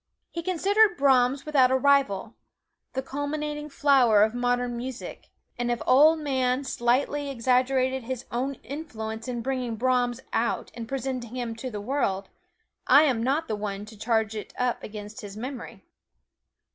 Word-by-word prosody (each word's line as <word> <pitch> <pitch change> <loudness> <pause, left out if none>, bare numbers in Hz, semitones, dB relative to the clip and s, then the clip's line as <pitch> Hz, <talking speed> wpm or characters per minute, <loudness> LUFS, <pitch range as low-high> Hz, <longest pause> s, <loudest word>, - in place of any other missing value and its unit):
He 335 - -4
considered 390 +4 +3
Brahms 265 -1 +3
without 275 -4 +4
a 260 - +3
rival 260 -6 +2 0.6
the 265 - -2
culminating 295 +2 -4
flower 260 -8 +4
of 220 +1 +1
modern 245 0 0
music; 250 +1 -7 0.3
and 240 0 -1
if 240 - +1
the - - -9
Ol' 295 +5 +6
Man 265 -3 0
slightly 270 +3 0
exaggerated 260 0 +1
his 260 0 -5
own 260 +3 -2
influence 225 -5 -6
in 240 -2 -3
bringing 250 -3 -2
Brahms 245 +1 +1
out 235 +1 -1
and 230 -1 -7
presenting 255 -2 -4
him 240 -2 -3
to 255 +3 -5
the 210 -4 -5
world, 205 -5 -1 0.6
I 290 - +7
am 260 -7 +1
not 280 +7 0
the 215 - -1
one 205 -1 -4
to 220 +1 -13
charge 220 0 0
it 210 - -7
up 250 -1 0
against 210 +3 -8
his 205 -1 -9
memory. 250 +2 -7
255 Hz, 160 wpm, -26 LUFS, 230-275 Hz, 0.6 s, I